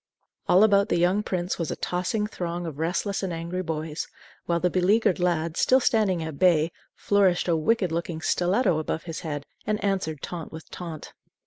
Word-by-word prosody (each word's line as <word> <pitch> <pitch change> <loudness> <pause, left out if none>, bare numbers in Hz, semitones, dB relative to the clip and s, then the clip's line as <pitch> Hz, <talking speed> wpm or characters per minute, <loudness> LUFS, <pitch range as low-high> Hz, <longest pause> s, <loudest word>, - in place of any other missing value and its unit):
All 185 +3 +6
about 200 -1 +4
the - - +2
young 180 +4 +3
prince 180 -3 -2
was 165 - -2
a - - -2
tossing 185 +4 -1
throng 175 -4 -4
of 155 -3 -6
restless 180 +5 -1
and 190 -2 -2
angry 170 +2 -3
boys, 160 -2 -4 0.4
while 170 0 +1
the 180 +1 +1
beleaguered 190 +1 +3
lad, 165 -2 0
still 260 - +5
standing 210 -9 +2
at 160 -3 -6
bay, 170 -3 +4 0.2
flourished 195 -4 +2
a 170 - +3
wicked 185 +2 +1
looking 165 -1 -3
stiletto 175 - +2
above 160 +1 -3
his 165 -2 -5
head 145 -3 -5 0.2
and 215 - +1
answered 185 -7 -1
taunt 170 -3 -6
with 160 0 -10
taunt. 165 -4 -7
175 Hz, 185 wpm, -26 LUFS, 160-195 Hz, 0.4 s, All